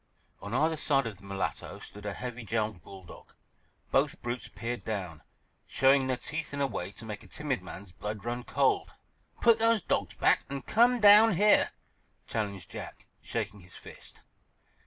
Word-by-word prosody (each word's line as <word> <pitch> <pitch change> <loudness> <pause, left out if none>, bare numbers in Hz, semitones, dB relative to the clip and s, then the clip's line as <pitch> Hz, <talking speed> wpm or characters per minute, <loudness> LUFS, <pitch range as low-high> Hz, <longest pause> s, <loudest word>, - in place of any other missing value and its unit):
On 100 - -7
either 155 +6 +2
side 140 -3 +2
of 110 -4 -5
the - - -19
mulatto 100 -1 -4
stood 105 0 -9
a 100 - -2
heavy 125 -1 -6
jowled 110 -4 -2
bull 95 +3 -12
dog. 85 - -14 0.6
Both - - +2
brutes 120 +1 -3
peered 120 +1 -5
down, 95 -7 -4 0.5
showing 135 0 +4
their 130 -1 0
teeth 155 +2 -5
in - - -4
a - - +3
way 95 -8 -4
to 115 - -11
make 105 -2 -6
a - - -15
timid 145 -8 -3
man's 95 0 -10
blood 105 +3 -6
run 120 +1 -3
cold. 400 - +1 0.5
"Put 230 -1 +5
those 225 -2 +3
dogs - - -1
back - - +3
and 140 0 -5
come 240 +2 +4
down 210 0 +8
here," 210 +4 +5 0.6
challenged 100 -5 -4
Jack, - - -8 0.2
shaking 105 -3 -4
his 90 0 -16
fist. - - -12
120 Hz, 175 wpm, -30 LUFS, 100-150 Hz, 0.6 s, down